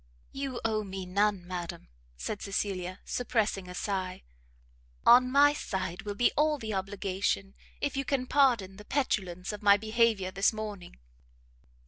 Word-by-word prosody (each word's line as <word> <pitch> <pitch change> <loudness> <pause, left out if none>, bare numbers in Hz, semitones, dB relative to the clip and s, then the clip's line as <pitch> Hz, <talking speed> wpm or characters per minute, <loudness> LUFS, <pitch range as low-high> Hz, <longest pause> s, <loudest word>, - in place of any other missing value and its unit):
"You 270 -2 -4
owe 215 -1 +1
me 190 -1 -6
none, 200 0 +1
madam," 175 -2 -6 0.3
said 205 - -4
Cecilia, 190 -2 -3
suppressing 215 -6 -1
a 180 - -7
sigh; 185 -1 -3 0.8
"on 250 +1 +7
my 285 +2 +6
side 190 - -3
will 205 -1 -5
be 245 - +3
all 300 0 +3
the 220 -5 -5
obligation, 195 0 -2 0.3
if 285 -2 -1
you 275 - 0
can 270 -2 -1
pardon 240 -9 +2
the 210 - -12
petulance 195 -9 -1
of 210 - -7
my 200 -1 +6
behaviour 220 -3 +1
this 195 +1 +3
morning." 210 - -7
205 Hz, 145 wpm, -30 LUFS, 190-240 Hz, 0.8 s, on